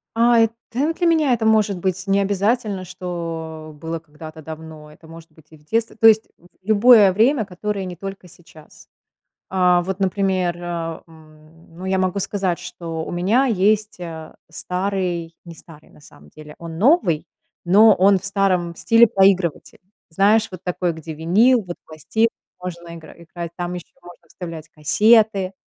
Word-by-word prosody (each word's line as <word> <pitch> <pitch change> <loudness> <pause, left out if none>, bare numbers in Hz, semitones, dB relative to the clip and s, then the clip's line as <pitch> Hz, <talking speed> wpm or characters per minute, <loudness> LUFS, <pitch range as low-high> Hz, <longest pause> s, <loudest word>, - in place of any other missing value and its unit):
А, 235 +1 +4
э, 225 - +5 0.2
та 285 +7 -1
для 345 - -2
меня 315 -5 +3
это 230 -2 -1
может 215 -3 +2
быть 190 +1 -2
необязательно, 200 +1 0
что 165 -3 -6
было 165 +2 -5
когда-то 155 0 -12
давно, 155 -1 -10
это 160 +2 -18
может 165 0 -13
быть 155 -1 -22
и 155 - -15
в 150 - -25
детстве, 225 +6 -1
то 225 - +5
есть 220 0 +5
в - - -26 0.2
любое 215 -1 +6
время, 225 +3 +2
которое 195 +1 -4
не 180 -1 -7
только 195 +1 -8
сейчас. 165 -3 -18 0.6
А, 180 -1 +3
вот, 190 +1 -4
например, 190 -2 0
а, 170 -2 -5
м, 160 +1 -20
ну 185 - -9
я 190 0 0
могу 185 +1 0
сказать, 190 -3 -2
что 170 -2 -6
у - - -7
меня 200 +10 +1
есть, 210 -1 +1
э, 165 -3 -8 0.2
старый- 180 -1 -3
не 170 -1 -11
старый, 160 -2 -16
на - - -20
самом 75 - -18
деле, 150 0 -13
он 165 -1 -8
новый,- 205 - +2 0.4
но 210 +5 +6
он 195 +1 +4
в 185 - -16
старом 190 -4 0
стиле 230 +1 +5
проигрыватель. 190 -6 +1 0.3
Знаешь, 210 +6 +3
вот 185 -2 -10
такой, 180 -1 -2
где 160 0 -8
винил, 215 +11 +3
вот 175 -2 -8
пластинки 190 +9 -1 0.3
можно 170 -2 -7
игра 160 -2 -12
играть, 170 0 -8
там 175 0 -4
еще 175 -2 -9
можно 175 0 -15
вставлять 165 -3 -9
кассеты, 200 +4 +3
180 Hz, 165 wpm, -20 LUFS, 165-205 Hz, 0.6 s, любое